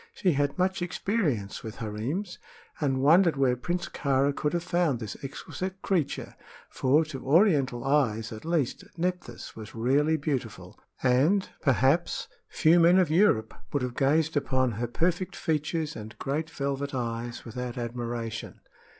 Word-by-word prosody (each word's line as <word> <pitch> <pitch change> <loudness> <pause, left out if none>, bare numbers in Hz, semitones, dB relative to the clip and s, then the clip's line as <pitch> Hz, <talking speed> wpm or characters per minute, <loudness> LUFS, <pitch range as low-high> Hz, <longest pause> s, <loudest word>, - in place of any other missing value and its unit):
She 185 - +2
had 145 -1 0
much 185 +1 +1
experience 175 - -1
with 110 -1 -6
harems, 125 - -4 0.4
and 135 -3 0
wondered 165 +1 +5
where 130 -2 +3
Prince 175 +7 -3
Kāra 140 0 +1
could 150 - -1
have 170 -1 0
found 170 -8 +1
this 110 -3 -5
exquisite 185 +7 -5
creature; 170 -8 -1 0.4
for, 145 +5 +3
to 140 -4 -7
Oriental 140 - +3
eyes, 120 -6 +1
at 110 -1 -8
least, 160 -6 -1
Nephthys 180 -8 -3
was 110 0 -9
rarely 140 +7 +2
beautiful, 140 -3 -4 0.2
and, 145 +11 +3
perhaps, 140 +4 +2 0.2
few 165 +2 +4
men 170 +2 +6
of 180 -5 +3
Europe 160 - +3 0.2
would 140 -3 0
have 125 -1 -2
gazed 155 +3 +2
upon 130 -3 +1
her 115 +3 -3
perfect 175 +8 -1
features 155 0 -1
and 110 +1 -9
great 155 +4 -2
velvet 140 -2 -3
eyes 120 -1 -4
without 125 +1 -5
admiration. 120 -1 -4
140 Hz, 145 wpm, -28 LUFS, 120-170 Hz, 0.4 s, men